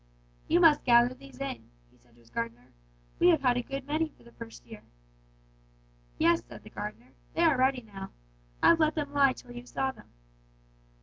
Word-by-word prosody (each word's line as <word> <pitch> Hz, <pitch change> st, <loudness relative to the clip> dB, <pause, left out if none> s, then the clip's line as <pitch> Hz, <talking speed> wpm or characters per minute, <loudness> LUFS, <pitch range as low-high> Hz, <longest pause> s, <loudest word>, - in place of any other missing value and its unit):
"'You 340 Hz, -, +3 dB
must 325 Hz, -4 st, +6 dB
gather 240 Hz, 0 st, +5 dB
these 270 Hz, 0 st, -15 dB
in,' 275 Hz, -2 st, -5 dB, 0.2 s
he -, -, -26 dB
said 120 Hz, -1 st, -27 dB
to 120 Hz, -, -22 dB
his 115 Hz, 0 st, -23 dB
gardener; 115 Hz, +1 st, -5 dB, 0.5 s
'we 350 Hz, -, +5 dB
have 320 Hz, -6 st, +4 dB
a 245 Hz, -1 st, +3 dB
good 275 Hz, +2 st, -6 dB
many 310 Hz, +2 st, 0 dB
for -, -, -24 dB
the 235 Hz, -, -16 dB
first 230 Hz, -1 st, -11 dB
year.' 220 Hz, -2 st, -11 dB, 1.4 s
"'Yes,' -, -, +3 dB
said -, -, -13 dB
the -, -, -13 dB
gardener, 120 Hz, +4 st, -7 dB, 0.2 s
'they 335 Hz, -, +2 dB
are 315 Hz, -5 st, +4 dB
ready 260 Hz, -1 st, +2 dB
now. 195 Hz, -3 st, -9 dB, 0.5 s
I've 335 Hz, -, +6 dB
let 310 Hz, -1 st, +2 dB
them 290 Hz, -2 st, -3 dB
lie 275 Hz, -2 st, +4 dB
till 245 Hz, -, -13 dB
you 245 Hz, 0 st, -9 dB
saw 265 Hz, +1 st, -1 dB
them.' -, -, -18 dB
255 Hz, 190 wpm, -29 LUFS, 225-290 Hz, 1.4 s, must